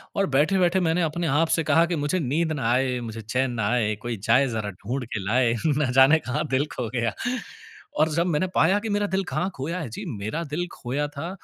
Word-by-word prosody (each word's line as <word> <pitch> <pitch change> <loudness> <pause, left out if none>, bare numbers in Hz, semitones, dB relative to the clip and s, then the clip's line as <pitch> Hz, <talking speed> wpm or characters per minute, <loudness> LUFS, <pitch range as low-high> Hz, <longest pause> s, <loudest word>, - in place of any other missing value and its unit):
और 195 - +2
बैठे-बैठे 180 +5 +3
मैंने 175 0 +1
अपने 165 +1 -1
आप 155 +3 +2
से 165 - 0
कहा 160 +3 +4
कि, 170 0 -2
"मुझे 145 +4 0
नींद 160 +3 0
ना 135 -7 -2
आए, 125 0 +1
मुझे 115 -1 -6
चैन 125 +4 -1
ना 115 -4 -1
आए, 110 -3 +1
कोई 120 -1 -4
जाए 130 +5 +5
ज़रा 110 -4 -3 0.2
ढूँढ 125 +3 -2
के 110 - -1
लाए 120 +2 +2
ना 150 -3 +2
जाने 140 +5 +7
कहाँ 130 -1 -2
दिल 135 +2 +2
खो 125 - -3
गया।" 115 -3 0 0.9
और 155 +1 +4
जब 170 +3 +1
मैंने 170 +2 +1
पाया 185 +7 +4
कि 220 +1 -5
मेरा 205 0 +1
दिल 195 0 0
कहाँ 185 - 0
खोया 165 +7 -3
है 155 -8 -5
जी 110 - -7
मेरा 110 +12 -3
दिल 175 +2 -2
खोया 140 +4 -3
था 145 +3 -6
145 Hz, 225 wpm, -25 LUFS, 125-170 Hz, 0.9 s, जाने